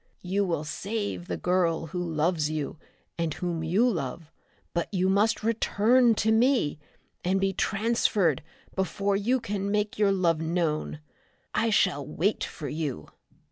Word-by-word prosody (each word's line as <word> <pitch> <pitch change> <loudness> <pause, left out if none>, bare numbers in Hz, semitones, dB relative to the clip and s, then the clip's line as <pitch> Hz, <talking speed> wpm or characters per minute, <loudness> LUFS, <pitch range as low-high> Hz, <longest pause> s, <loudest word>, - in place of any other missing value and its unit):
You 190 +3 0
will 165 -4 -1
save 205 +2 -4
the - - -3
girl 175 -3 +1
who 180 -1 -1
loves 160 -1 0
you 155 0 -4 0.4
and 165 -3 -1
whom 170 -2 -3
you 190 +10 +3
love, 165 - -3 0.4
but 170 +3 -2
you 185 -2 +1
must 205 +3 +2
return 230 +2 +3
to 220 +1 +2
me 230 - +3 0.4
and 190 +2 +1
be 195 0 +1
transferred 200 - +1 0.3
before 195 +1 0
you 235 +6 +1
can 200 -3 -3
make 210 0 -1
your 205 -2 +4
love 170 -4 +2
known. 160 -2 -1 0.5
I 230 - +2
shall 185 -8 +2
wait 170 +9 -1
for 150 - -6
you!" 145 - -4
185 Hz, 145 wpm, -27 LUFS, 160-210 Hz, 0.5 s, your